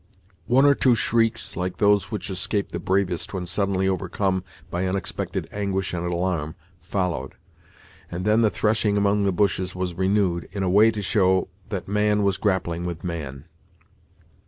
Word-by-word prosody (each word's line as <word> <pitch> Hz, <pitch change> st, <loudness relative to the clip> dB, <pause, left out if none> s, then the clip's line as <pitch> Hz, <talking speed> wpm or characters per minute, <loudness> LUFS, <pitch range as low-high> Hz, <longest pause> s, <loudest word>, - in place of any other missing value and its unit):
One 130 Hz, +3 st, +5 dB
or 145 Hz, -, +7 dB
two 130 Hz, -3 st, +3 dB
shrieks, 115 Hz, 0 st, +1 dB
like 90 Hz, 0 st, -3 dB
those 100 Hz, -2 st, +3 dB
which 105 Hz, -2 st, -4 dB
escape 100 Hz, +2 st, -1 dB
the -, -, -3 dB
bravest 95 Hz, -1 st, -1 dB
when 90 Hz, -1 st, -3 dB
suddenly 95 Hz, +1 st, 0 dB
overcome 95 Hz, 0 st, -1 dB, 0.3 s
by 90 Hz, +2 st, -1 dB
unexpected 95 Hz, +1 st, -3 dB
anguish 95 Hz, -2 st, -2 dB
and 85 Hz, -1 st, -2 dB
alarm, 85 Hz, -3 st, -1 dB, 0.3 s
followed; 90 Hz, -9 st, -2 dB, 0.7 s
and 90 Hz, +2 st, -5 dB
then 110 Hz, +2 st, +4 dB
the 110 Hz, -, +4 dB
threshing 105 Hz, -1 st, +1 dB
among 100 Hz, 0 st, +2 dB
the 100 Hz, -, +2 dB
bushes 95 Hz, -1 st, 0 dB
was 90 Hz, -1 st, -2 dB
renewed, 95 Hz, -1 st, 0 dB
in 100 Hz, -2 st, -2 dB
a 95 Hz, -, +1 dB
way 105 Hz, +4 st, +6 dB
to 105 Hz, -2 st, -3 dB
show 95 Hz, -1 st, +2 dB, 0.2 s
that -, -, -4 dB
man 105 Hz, +1 st, +2 dB
was 100 Hz, -2 st, +1 dB
grappling 90 Hz, -4 st, -1 dB
with 85 Hz, -2 st, -5 dB
man. 75 Hz, -6 st, -5 dB
95 Hz, 160 wpm, -24 LUFS, 90-105 Hz, 0.7 s, or